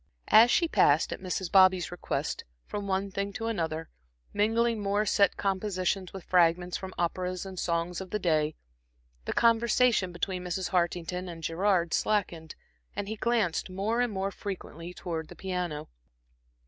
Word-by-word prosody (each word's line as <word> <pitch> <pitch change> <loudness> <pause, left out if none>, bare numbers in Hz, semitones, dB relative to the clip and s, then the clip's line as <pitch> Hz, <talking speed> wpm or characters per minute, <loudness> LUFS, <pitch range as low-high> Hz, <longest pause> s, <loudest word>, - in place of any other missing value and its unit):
As 225 +3 +8
she 335 +7 +3
passed 150 - +3
at - - -7
Mrs. 185 -1 -3
Bobby's 185 -2 +5
request 175 - -3 0.2
from 205 -1 -5
one 195 +1 -1
thing 200 +1 -2
to 225 - -4
another, 165 -7 -2 0.4
mingling 225 +2 +1
more 205 +1 +1
set 200 0 +3
compositions 190 -1 -1
with 190 -2 -8
fragments 175 0 +2
from 190 -1 -6
operas 180 +2 -2
and 190 -2 -7
songs 170 +1 -1
of 190 - -8
the 210 - -1
day, 155 -5 +1 0.7
the - - -2
conversation 230 -3 +3
between 180 +1 -3
Mrs. 180 +1 -2
Hartington 180 0 -1
and 165 -1 -9
Gerard 170 +1 +1
slackened, 175 -7 -1 0.4
and 200 - -3
he 220 - -3
glanced 220 -7 0
more 205 +6 -1
and 245 -2 +1
more 195 0 -2
frequently 180 -4 -7
towards 165 -3 -5
the - - -11
piano. 180 -5 -3
185 Hz, 155 wpm, -29 LUFS, 175-205 Hz, 0.7 s, As